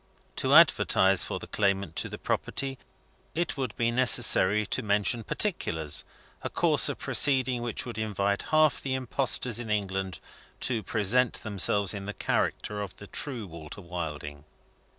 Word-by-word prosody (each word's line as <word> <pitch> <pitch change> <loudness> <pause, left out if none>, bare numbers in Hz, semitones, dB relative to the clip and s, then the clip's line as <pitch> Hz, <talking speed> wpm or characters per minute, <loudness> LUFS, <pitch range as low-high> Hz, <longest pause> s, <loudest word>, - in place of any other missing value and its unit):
To - - +2
advertise 95 -1 +5
for - - -4
the - - -8
claimant 100 -4 -1
to - - -2
the - - -7
property, 135 -1 -3 0.6
it 170 0 -1
would 130 -6 -4
be 115 0 +1
necessary 115 -4 +4
to - - -2
mention 105 +2 0
particulars 80 - -1 0.4
a - - -4
course - - +3
of - - -4
proceeding 130 -3 +2
which 120 -2 -3
would 120 -3 -6
invite 100 -2 -1
half 155 -1 +3
the 130 -1 -2
impostors 125 -2 0
in 120 -2 -6
England 95 -3 -2 0.4
to 120 -4 0
present 115 +4 0
themselves 100 -2 +2
in 100 -1 -6
the 105 - -5
character 105 0 -1
of 100 -3 -6
the 100 - -11
true 120 +1 -5
Walter 85 +2 -10
Wilding. 75 -5 -6
105 Hz, 150 wpm, -28 LUFS, 95-125 Hz, 0.6 s, advertise